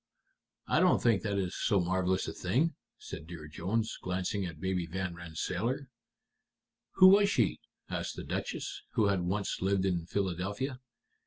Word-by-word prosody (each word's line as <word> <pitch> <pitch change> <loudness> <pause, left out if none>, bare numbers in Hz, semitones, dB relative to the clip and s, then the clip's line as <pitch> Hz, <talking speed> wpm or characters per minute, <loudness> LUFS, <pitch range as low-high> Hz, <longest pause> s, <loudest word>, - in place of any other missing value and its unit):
"I - - +2
don't - - +5
think 115 -5 +3
that 100 -2 -1
is 95 -2 -1
so 100 -4 +2
marvelous 95 +1 +1
a - - -4
thing," 130 - +1 0.2
said 80 - -8
Dear 80 -3 -8
Jones, 100 +9 -2
glancing 95 +1 -1
at 80 -3 -8
Baby 90 -1 -1
Van 90 +1 -3
Rensselaer. 90 - -3 1.0
"Who 185 -1 +9
was 200 +1 +6
she?" - - +2 0.3
asked - - -3
the - - -6
Duchess, - - -4
who 105 -3 +3
had 100 -2 +1
once 95 +3 -1
lived 95 0 +2
in 85 -3 0
Philadelphia. 100 - -2
95 Hz, 155 wpm, -31 LUFS, 90-110 Hz, 1.0 s, Who